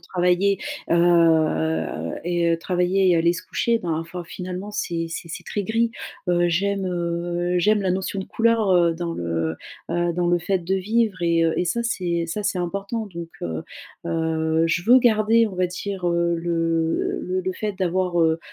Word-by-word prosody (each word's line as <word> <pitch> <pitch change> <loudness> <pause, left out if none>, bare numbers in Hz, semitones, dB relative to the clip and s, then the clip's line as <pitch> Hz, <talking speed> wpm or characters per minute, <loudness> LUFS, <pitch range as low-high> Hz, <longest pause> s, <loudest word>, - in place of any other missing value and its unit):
travailler, 180 +3 +1 0.3
heu 155 - +2
et 175 0 +1
heu, 165 - +2
travailler, 180 +1 +2
aller 170 +1 +3
se 175 - -6
coucher, 235 -1 0
ben, 170 - -3
enfin, 165 +2 -6
finalement, 185 +3 -6
c'est 170 -5 -2
c'est 165 0 -6
c'est - - -7
très 205 -2 -3
gris, 230 +3 +1 0.4
heu. 175 0 +3
J'aime, 195 +3 0
heu, 175 0 -1
j'aime 210 +3 +3
la 185 - +1
notion 190 +1 -2
de - - -5
couleur, 225 -3 +2
heu, 170 -2 +4
dans 170 0 -3
le, 85 - -2 0.3
heu, 175 0 0
dans 175 0 0
le 175 - +3
fait 190 +3 0
de 190 +3 -1
vivre 210 -1 0
et 170 -1 +3
heu, 165 - +2
et - - +1
ça 235 +7 -1
c'est 175 -7 -1
ça 205 +5 -4
c'est 200 -2 0
important. 200 +5 -3
Donc, 170 -3 -8
heu 80 -1 -4 0.4
heu, 160 -1 0
je 175 +1 0
veux 250 +3 +7
garder, 225 -1 +4
on 185 - -9
va 185 - +2
dire, 185 0 -4
heu, 170 0 +1
le 165 -1 0
le 185 +1 -2
le 185 +1 -2
fait 210 +2 -3
d'avoir, 185 -2 0
heu 160 0 +3
175 Hz, 185 wpm, -23 LUFS, 170-195 Hz, 0.4 s, veux